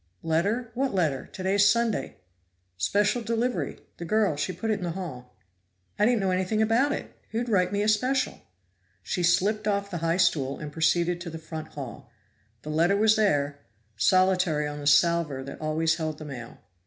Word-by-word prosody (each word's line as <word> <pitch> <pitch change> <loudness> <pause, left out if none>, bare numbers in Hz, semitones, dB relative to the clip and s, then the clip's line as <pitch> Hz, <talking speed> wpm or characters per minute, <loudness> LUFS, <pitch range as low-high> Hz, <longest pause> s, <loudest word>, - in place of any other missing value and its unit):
"Letter? 205 +9 0
What 260 -2 -1
letter? 155 -8 0
Today's 195 +2 +2
Sunday." 235 -1 0 0.6
"Special 205 - +1
delivery. 235 +2 -1 0.2
The - - -6
girl, 210 -2 +2
she 145 +4 -2
put 200 +6 -3
it 210 - 0
in - - -6
the 170 -2 -2
hall." 125 -10 -7 0.6
"I 210 - +5
didn't 240 -3 +2
know 190 -1 +1
anything 185 +4 0
about 230 +6 +3
it. - - -5
Who'd 235 +2 -2
write 185 -4 +2
me 205 0 0
a - - 0
special?" 255 +6 +1 0.6
She 180 - -2
slipped 205 +5 +2
off 200 -1 -1
the 175 - -3
high 165 +1 0
stool 145 -6 +1
and 150 -1 -7
proceeded 170 +2 +1
to 175 - -5
the 160 - -7
front 160 -1 -7
hall. 135 -2 -8 0.5
The 155 - -5
letter 170 +6 +3
was 220 +1 +4
there, 145 -9 +1 0.4
solitary 180 - +2
on 150 0 -6
the 145 - -4
salver 150 -2 +3
that 140 +3 -9
always 160 +1 +1
held 155 -2 -3
the 155 - -9
mail. 125 -5 -8
180 Hz, 180 wpm, -26 LUFS, 155-210 Hz, 0.6 s, I